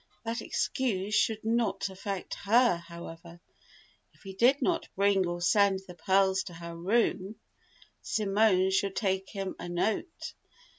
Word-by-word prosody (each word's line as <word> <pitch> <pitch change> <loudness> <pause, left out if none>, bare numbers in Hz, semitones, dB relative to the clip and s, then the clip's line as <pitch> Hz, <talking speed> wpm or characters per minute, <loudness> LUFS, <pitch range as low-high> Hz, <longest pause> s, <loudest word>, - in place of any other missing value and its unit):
That 230 +1 -2
excuse 210 -6 -1
should 220 +1 +1
not 220 -4 0
affect 190 0 -5
her, 230 0 +3
however. 170 0 -11 0.8
If - - -24
he 195 -1 -8
did 250 +8 +4
not 330 -3 0
bring 195 -1 +3
or 175 0 -4
send 195 +1 +3
the 180 - -10
pearls 190 +2 +2
to 175 - -9
her 170 0 -8
room, 195 +2 0 0.7
Simone 200 -3 +2
should 195 0 0
take 190 -2 -1
him 195 -2 -5
a 175 - -6
note. 215 - -2
195 Hz, 140 wpm, -29 LUFS, 185-220 Hz, 0.8 s, did